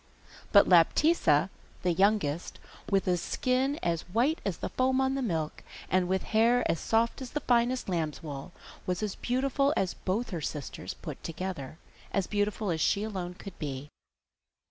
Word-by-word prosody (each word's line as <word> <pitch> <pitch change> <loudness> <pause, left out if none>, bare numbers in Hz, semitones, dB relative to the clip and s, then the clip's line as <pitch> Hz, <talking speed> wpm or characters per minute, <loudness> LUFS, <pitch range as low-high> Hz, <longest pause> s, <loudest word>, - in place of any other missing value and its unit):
But 200 - +7
Laptitza, 180 - +4 0.3
the 180 -1 +2
youngest, 190 -5 +1 0.3
with 195 -2 +2
a 180 -1 +3
skin 255 - 0
as 170 -2 0
white 250 - +1
as 195 -5 -2
the - - -4
foam 260 +1 +1
on 265 0 +2
the 275 - -1
milk, 160 -10 -2 0.3
and 185 -1 +3
with 190 +1 0
hair 235 +3 +4
as 165 - 0
soft 230 +3 +1
as 260 - -5
the 295 - -2
finest 245 0 +2
lamb's 165 -5 -2
wool, 145 +2 -6 0.4
was 180 +3 -1
as 210 -2 -1
beautiful 275 +3 +1
as 190 -2 +1
both 215 +6 -2
her 170 -3 -3
sisters 150 -2 -5
put - - -8
together 165 -4 -5 0.3
as 195 -2 +1
beautiful 205 0 -1
as 160 -1 -1
she 200 +6 +2
alone 185 -5 -4
could 195 0 -10
be. 145 -1 -5
195 Hz, 165 wpm, -29 LUFS, 170-245 Hz, 0.4 s, But